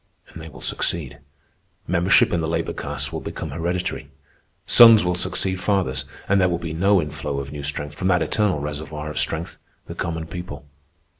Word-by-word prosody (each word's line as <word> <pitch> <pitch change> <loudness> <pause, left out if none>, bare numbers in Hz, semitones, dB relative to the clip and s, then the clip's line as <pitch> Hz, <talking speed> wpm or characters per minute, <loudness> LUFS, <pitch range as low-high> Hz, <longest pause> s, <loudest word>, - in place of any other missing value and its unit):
And 80 - -10
they 80 - -9
will - - -13
succeed. 75 -5 -2 0.7
Membership 95 +6 +3
in 85 - +1
the 80 - -2
labor 80 - -2
castes - - -3
will - - -2
become 80 - -6
hereditary. 85 -2 -3 0.6
Sons 115 -4 +8
will 90 - +1
succeed 95 +1 -1
fathers, 95 -8 0 0.2
and 100 0 +3
there 90 - +3
will 85 - 0
be 85 -2 -5
no 95 +4 +3
inflow 75 -2 -4
of 70 0 -6
new 75 -1 -6
strength 75 +1 -4
from 90 +5 -3
that 90 -3 +3
eternal 100 +1 +1
reservoir 75 +1 -5
of 75 - -3
strength, 80 +3 -3 0.3
the - - -7
common 80 -1 -4
people. 90 0 -8
85 Hz, 180 wpm, -22 LUFS, 75-90 Hz, 0.7 s, Sons